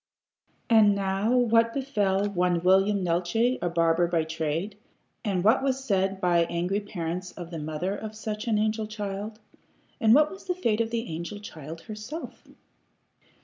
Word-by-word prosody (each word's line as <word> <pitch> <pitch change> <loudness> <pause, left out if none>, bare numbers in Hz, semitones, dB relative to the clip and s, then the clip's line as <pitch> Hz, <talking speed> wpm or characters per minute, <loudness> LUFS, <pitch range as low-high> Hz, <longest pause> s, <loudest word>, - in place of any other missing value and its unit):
And 215 -3 +5
now 195 +2 0
what 230 -1 +3
befell 205 -8 0
one 180 -3 0
William 195 +2 +4
Neeltje, 185 +9 +1
a 175 - 0
barber 170 0 +2
by 170 -2 +1
trade? 160 +5 -3 0.5
And 195 -5 0
what 220 +6 +4
was 270 -1 -1
said 195 -4 0
by 175 -2 +3
angry 175 +4 -1
parents 180 -3 -5
of 175 -1 -9
the 165 - -5
mother 155 +6 -3
of 215 +1 -7
such 215 +1 -5
an 220 -2 +2
angel 215 0 0
child? 210 0 -5 0.6
And 225 -2 +6
what 300 +1 +4
was 380 - -11
the 360 - -1
fate 230 -11 +1
of 225 - -1
the 230 0 -2
angel 170 +6 -5
child 160 -5 -9
herself? 215 - -8
200 Hz, 160 wpm, -27 LUFS, 175-220 Hz, 0.6 s, And